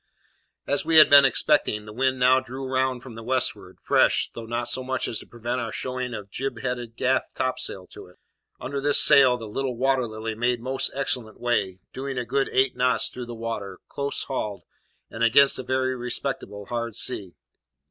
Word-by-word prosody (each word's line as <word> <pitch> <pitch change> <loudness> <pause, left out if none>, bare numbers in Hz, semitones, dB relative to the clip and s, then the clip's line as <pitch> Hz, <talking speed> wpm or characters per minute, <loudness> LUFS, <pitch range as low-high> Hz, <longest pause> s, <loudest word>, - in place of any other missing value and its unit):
As 140 - 0
we 160 0 +3
had 155 - +8
been 140 -1 +9
expecting, 135 -6 +1
the 105 - -10
wind 130 +2 0
now 130 +1 +4
drew 130 +1 -7
round 130 -1 -1
from 130 - -10
the 115 - -9
westward, 130 +3 0
fresh, - - +3
though 115 -1 -8
not 120 +1 -3
so 125 +2 +1
much 130 0 -2
so - - -3
as 115 - -2
to - - -12
prevent 120 +2 -4
our 115 -1 -4
showing 125 0 -4
a 105 - -7
jib 120 +3 -5
headed 120 -2 -4
gaff 130 +2 0
topsail 115 -7 -2
to - - -10
it. 90 - -19 0.4
Under 140 0 -4
this 145 +1 +4
sail 135 -4 +6
the 115 - -8
little 125 +3 -3
Water 130 -1 +1
Lily 110 +1 -5
made 120 +2 0
most 130 +3 -1
excellent 125 -5 -3
way; 100 -7 -1
going 135 0 -5
a 125 - -2
good 135 +4 0
eight 130 0 +2
knots 125 0 +1
through 125 -1 -8
the 120 - -7
water, 110 -4 -5
close 140 0 -2
hauled, 105 -7 -4 0.5
and 115 - -3
against 135 +5 +5
a - - -4
very 130 0 -1
respectable 120 -4 -4
head 115 -1 -4
sea. 95 -4 -2
125 Hz, 200 wpm, -24 LUFS, 115-130 Hz, 0.5 s, been